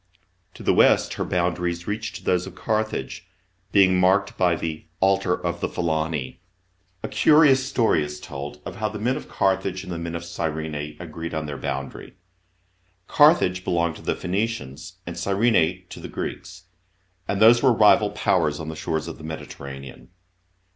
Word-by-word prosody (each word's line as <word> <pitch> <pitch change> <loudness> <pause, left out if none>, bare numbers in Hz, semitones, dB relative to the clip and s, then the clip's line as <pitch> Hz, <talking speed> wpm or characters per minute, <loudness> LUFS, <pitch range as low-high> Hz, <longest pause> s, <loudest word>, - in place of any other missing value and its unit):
To - - -10
the - - +3
west - - +4
her - - -2
boundaries 85 -1 -1
reached 110 +2 -5
those 90 0 +1
of 95 - -10
Carthage, 110 -3 -3 0.4
being 95 -2 +5
marked 95 +2 +3
by 90 -2 +2
the 80 -1 -5
" - - -43
Altar 95 -1 +2
of 85 0 -2
the - - -1
Phitaeni." 80 -5 -2 0.6
A - - -2
curious 150 -4 +5
story 110 - +2
is 75 0 -6
told 70 +1 -8
of 90 - -7
how 110 0 -1
the 105 - -6
men 120 +5 0
of 150 - -7
Carthage 95 -1 0
and 90 - -8
the 85 - -4
men 85 0 -5
of 85 - -5
Gyrene 80 -3 -4
agreed 85 -1 -6
on 80 0 -2
their 75 -1 -5
boundary. - - -5 0.9
Carthage 145 - +4
belonged 85 -2 0
to - - -13
the - - -1
Phoenicians 90 -7 -3
and 85 - -6
Gyrene 95 -1 +1
to - - -9
the - - -7
Greeks, 90 -1 -6 0.6
and 100 - -1
these 115 +2 +7
were 130 - +5
rival 110 -3 +5
Powers 75 -1 +1
on 80 0 -5
the 80 - -6
shores 80 0 -3
of 80 - -8
the - - -11
Mediterranean. 70 -4 -8
90 Hz, 170 wpm, -24 LUFS, 80-100 Hz, 0.9 s, these